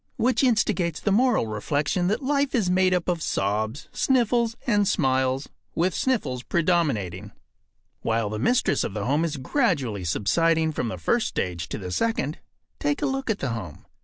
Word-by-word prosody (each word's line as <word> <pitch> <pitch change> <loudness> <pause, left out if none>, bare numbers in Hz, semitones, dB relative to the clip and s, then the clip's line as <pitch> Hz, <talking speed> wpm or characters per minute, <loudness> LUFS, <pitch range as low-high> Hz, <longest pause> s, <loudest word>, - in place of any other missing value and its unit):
Which 255 +4 +2
instigates 210 - +1
the 205 - 0
moral 235 - +3
reflection 145 - -1
that 215 +8 0
life 280 0 +1
is 200 -7 +1
made 185 0 +3
up 180 -2 0
of 175 -2 0
sobs, 110 +5 -1
sniffles, 235 -3 +2
and 205 -4 +2
smiles, 130 -6 +1 0.3
with 180 +3 +1
sniffles 210 - -1
predominating. 125 - 0 0.7
While 115 -2 0
the 110 - -3
mistress 245 - +2
of - - -4
the 105 -2 -2
home 145 +5 +1
is 160 -3 -2
gradually 135 - 0
subsiding 160 - +2
from 125 - -2
the 110 - -4
first 80 - +1
stage 85 -2 -3
to - - -4
the 90 -4 -6
second, 160 - -1 0.4
take 145 0 -1
a - - +3
look 270 -1 -2
at 220 - +1
the 140 - -3
home. 105 -10 -6
160 Hz, 170 wpm, -25 LUFS, -, 0.7 s, moral